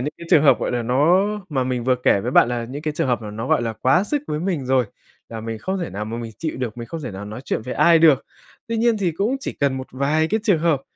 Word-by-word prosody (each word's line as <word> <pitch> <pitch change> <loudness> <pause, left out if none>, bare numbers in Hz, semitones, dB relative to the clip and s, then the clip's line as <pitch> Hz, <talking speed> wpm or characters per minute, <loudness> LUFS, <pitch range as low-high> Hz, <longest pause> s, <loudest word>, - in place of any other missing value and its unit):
những 145 +4 -3
cái 170 - -9
trường 150 - +6
hợp 135 -4 +5
gọi - - -1
là 120 -1 -1
nó 150 - +3 0.2
mà 135 -5 -1
mình 125 -2 -2
vừa 130 - +3
kể 110 -5 +2
với 120 - -3
bạn - - +5
là 120 -1 -2
những 135 +5 -7
cái 155 -1 -2
trường - - 0
hợp 120 -2 0
mà 105 - -6
nó 110 +4 -5
gọi - - +2
là 115 - -2
quá 130 - +2
sức 290 +6 -2
với 150 +1 -3
mình 170 -8 -2
rồi, 130 -1 +3 0.4
là 115 -1 -6
mình 115 0 -5
không 190 - -3
thể 170 - -4
nào 105 +2 -4
mà 110 +2 -5
mình 115 -1 -6
chịu 160 -2 -3
được, 125 -2 -4
mình 115 - -6
không 165 - -6
thể 125 - -5
nào 95 +1 -7
nói 105 +4 -7
chuyện 120 - -3
với 125 - -5
ai 170 -1 +5
được. 155 -5 +4 0.4
Tuy 230 - -2
nhiên 230 -1 +2
thì 180 -5 0
cũng 215 +11 0
chỉ - - -4
cần 140 -2 +2
một 130 0 -6
vài 145 +4 +1
cái 220 0 0
trường 200 -8 +3
hợp 155 -4 +1
130 Hz, 305 wpm, -21 LUFS, 120-165 Hz, 0.4 s, trường